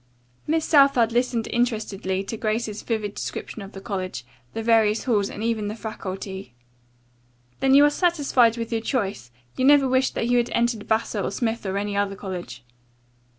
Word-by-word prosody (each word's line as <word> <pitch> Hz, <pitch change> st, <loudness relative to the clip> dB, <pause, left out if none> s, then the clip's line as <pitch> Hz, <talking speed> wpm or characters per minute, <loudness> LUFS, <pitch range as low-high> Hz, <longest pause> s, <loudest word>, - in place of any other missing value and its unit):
Miss 320 Hz, +1 st, +1 dB
Southard 275 Hz, -6 st, +5 dB
listened 240 Hz, -1 st, 0 dB
interestedly 215 Hz, -5 st, -1 dB
to 200 Hz, -, -5 dB
Grace's 215 Hz, -1 st, -2 dB
vivid 215 Hz, -3 st, -2 dB
description 220 Hz, -, -6 dB
of 195 Hz, 0 st, -10 dB
the 195 Hz, -, -8 dB
college, 185 Hz, -, -4 dB, 0.3 s
the 225 Hz, -, -3 dB
various 220 Hz, -1 st, +3 dB
halls 210 Hz, -6 st, +1 dB
and 210 Hz, -, -6 dB
even 225 Hz, -2 st, -1 dB
the 210 Hz, -, -4 dB
faculty. 195 Hz, -, -7 dB, 1.0 s
"Then 270 Hz, 0 st, +4 dB
you 285 Hz, +1 st, +8 dB
are -, -, +5 dB
satisfied 285 Hz, -9 st, +2 dB
with 230 Hz, 0 st, -4 dB
your 225 Hz, -1 st, 0 dB
choice? 200 Hz, -, -2 dB, 0.3 s
You 255 Hz, -, 0 dB
never 280 Hz, -1 st, +6 dB
wish 260 Hz, 0 st, +2 dB
that 230 Hz, -, -1 dB
you 245 Hz, 0 st, +3 dB
had 240 Hz, 0 st, +1 dB
entered 235 Hz, -2 st, 0 dB
Vassar 220 Hz, -1 st, 0 dB
or -, -, -1 dB
Smith 225 Hz, +1 st, -2 dB
or 190 Hz, +1 st, -1 dB
any 205 Hz, 0 st, -2 dB
other 200 Hz, -1 st, 0 dB
college?" 180 Hz, -11 st, -7 dB
225 Hz, 175 wpm, -24 LUFS, 200-245 Hz, 1.0 s, you